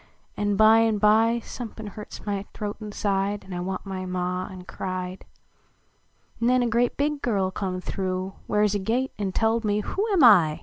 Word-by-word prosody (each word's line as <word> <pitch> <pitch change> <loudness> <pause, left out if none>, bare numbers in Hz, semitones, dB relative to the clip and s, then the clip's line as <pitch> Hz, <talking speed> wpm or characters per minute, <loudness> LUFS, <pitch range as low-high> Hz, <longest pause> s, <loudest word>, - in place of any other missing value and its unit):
An 205 -1 0
by 220 +2 +6
an 225 -1 +2
by 220 +3 +4
Somepin 225 -2 -8
hurts 210 +1 -10
my 200 -2 -2
throat 205 -1 -4
inside 205 -1 -1
An 190 - -9
I 175 - -3
want 185 +2 -4
my 190 -1 -5
Ma 180 0 -2
an 185 -2 -9
cried. 185 0 -5 1.2
Xen 250 +1 +3
a - - +1
grea 235 +1 +2
big 290 0 0
girl 195 -5 0
come 185 -2 -3
through 185 0 -3
Where 210 0 +2
s 210 -1 +2
a 205 - 0
gate, 240 +7 -1
an 195 -2 -1
telled 225 +3 +1
me 210 0 +1
who 390 - -2
Am 380 -5 +3 0.3
T - - -13
205 Hz, 185 wpm, -25 LUFS, 190-225 Hz, 1.2 s, by